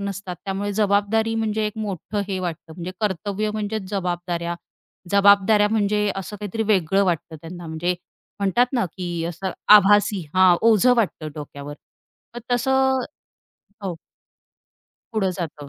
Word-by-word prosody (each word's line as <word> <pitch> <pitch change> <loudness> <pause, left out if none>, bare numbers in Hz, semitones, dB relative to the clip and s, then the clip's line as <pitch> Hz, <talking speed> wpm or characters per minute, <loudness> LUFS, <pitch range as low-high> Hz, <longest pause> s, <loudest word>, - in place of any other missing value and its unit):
नसतात 200 -2 -5
त्यामुळे 200 +1 -2
जबाबदारी 210 +2 +1
म्हणजे 220 -1 0
एक 210 +1 -6
मोठं 205 0 -3
हे 190 -1 -2
वाटतं 170 -3 -5
म्हणजे 175 +1 -6
कर्तव्य 205 +1 -1
म्हणजेच 210 -2 -4
जबाबदाऱ्या. 175 -3 -2 0.6
जबाबदाऱ्या 200 +1 +5
म्हणजे 210 -1 +1
असं 195 +2 -6
काहीतरी 210 +2 -3
वेगळं 195 -1 +3
वाटतं 170 -3 -2
त्यांना 175 +1 -9
म्हणजे, 160 +3 -1 0.5
म्हणतात 200 +5 +3
ना, 245 -5 +1
की 175 -3 -3
असं 175 +3 -4 0.2
आभासी 205 0 +5
हां 185 -1 +6
ओझं 230 +2 +5
वाटतं 185 -8 -1
डोक्यावर. 145 -1 -8 0.6
मग 240 - -6
तसं, 265 +1 +2 0.8
हो. 190 -3 -3 1.2
पुढं 200 -4 +1
जातं. 150 -4 -6
200 Hz, 130 wpm, -22 LUFS, 175-215 Hz, 1.2 s, हां